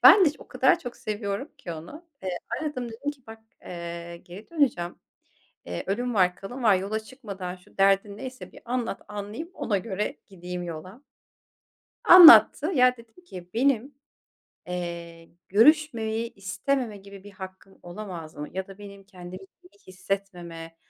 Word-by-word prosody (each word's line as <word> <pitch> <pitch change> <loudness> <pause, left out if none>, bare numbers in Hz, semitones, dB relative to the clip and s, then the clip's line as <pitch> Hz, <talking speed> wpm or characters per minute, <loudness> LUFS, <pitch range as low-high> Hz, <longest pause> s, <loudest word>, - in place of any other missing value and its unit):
Ben 390 - +10
de - - +6
iş 295 - -6
o - - -14
kadar - - +3
çok 245 -7 -8
seviyorum 210 +5 -4
ki 170 - -6
onu, 175 - -10 0.2
eee, 180 -2 -3 0.2
aradım 255 -6 -3
dedim 245 +6 -4
ki 275 -3 -14
"Bak, 225 0 -10 0.2
eee, 170 -1 -7
geri 180 +4 -13
döneceğim, 250 - 0 0.7
eee, 85 0 -4
ölüm 240 +5 -1
var 180 -3 +3
kalım 245 +7 -8
var 215 -4 +6
yola 200 +4 -2
çıkmadan 200 -7 -7
şu 180 +1 -23
derdin 195 +1 +3
neyse 255 +3 -8
bir - - -14
anlat 240 -3 -3
anlayayım 210 - -6
ona 205 -3 0
göre 200 +1 -3
gideyim 180 -2 -6
yola." 175 - -8 1.0
Anlattı. 345 -3 +10
Ya, 250 -2 +5
dedim 235 +10 -18
ki 180 - -10
"Benim, 270 +2 +1 0.7
eee, 170 -2 -6 0.2
görüşmemeyi 230 - +3
istememe 210 +5 -2
gibi 200 0 -13
bir 205 - -11
hakkım 190 0 -11
olamaz 175 -3 -8
mı 150 0 -6
ya 190 0 -3
da 195 0 -12
benim 200 -1 -11
kendimi 185 -1 -10 0.2
iyi 200 +3 -21
hissetmeme 180 -3 -5
200 Hz, 150 wpm, -26 LUFS, 180-240 Hz, 1.0 s, Ben